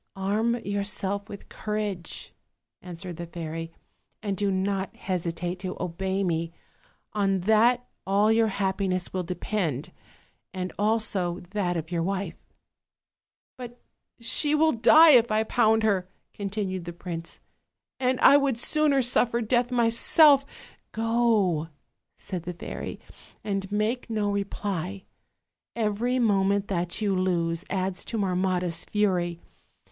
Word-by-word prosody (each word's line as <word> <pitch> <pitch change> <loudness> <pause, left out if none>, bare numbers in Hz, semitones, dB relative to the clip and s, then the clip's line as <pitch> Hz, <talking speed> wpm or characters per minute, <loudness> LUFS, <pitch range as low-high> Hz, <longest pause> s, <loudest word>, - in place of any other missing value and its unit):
"Arm 210 +5 0
yourself 200 0 -2
with 200 -2 -10
courage," 210 -5 -4 0.5
answered 180 -1 -8
the 170 - -6
fairy, 165 -1 -6 0.5
"and 200 -2 -1
do 205 0 0
not 190 0 -1
hesitate 175 -1 -3
to 185 0 -5
obey 190 +2 -2
me; 165 -2 -1 0.6
on 195 -3 +1
that 230 +5 +3 0.2
all 205 +3 +3
your 225 0 +3
happi 195 -1 -1
ness 185 -1 -2
will 185 - -1
depend, 170 - -3 0.6
as 185 0 -3
also 205 -5 +1
that 185 -4 -1
of 165 +1 -5
your 170 -1 0
wife." 195 +3 -2 1.3
"But 240 -1 -9 0.4
she 290 +6 +1
will 315 +1 +4
die 310 +7 +7
if 240 -4 +5
I 215 +1 +2
pound 220 -1 +2
her," 190 -4 +1 0.2
continued 195 -3 -4
the 175 - -6
prince, 170 -1 -7 0.6
"and 255 0 +1
I 285 - +8
would 275 -4 +1
sooner 285 +1 +3
suffer 240 -1 +1
death 240 +2 +1
myself 265 +4 +5 0.2
" - - -32
"Go," 220 -8 +1 0.5
said 185 -3 -5
the 175 +1 -6
fairy, - - -6 0.4
"and 195 -2 -3
make 215 +4 -1
no 210 -2 0
reply: 200 -2 -3 0.7
every 230 +3 0
mo 205 -6 +3
ment 200 +1 0
that 175 +2 -1
you 200 -2 +1
lose 175 -1 0
adds 185 -1 -2
to 230 - -4
Marmotta's 180 -3 0
fury. 180 -5 0
200 Hz, 130 wpm, -26 LUFS, 180-225 Hz, 1.3 s, I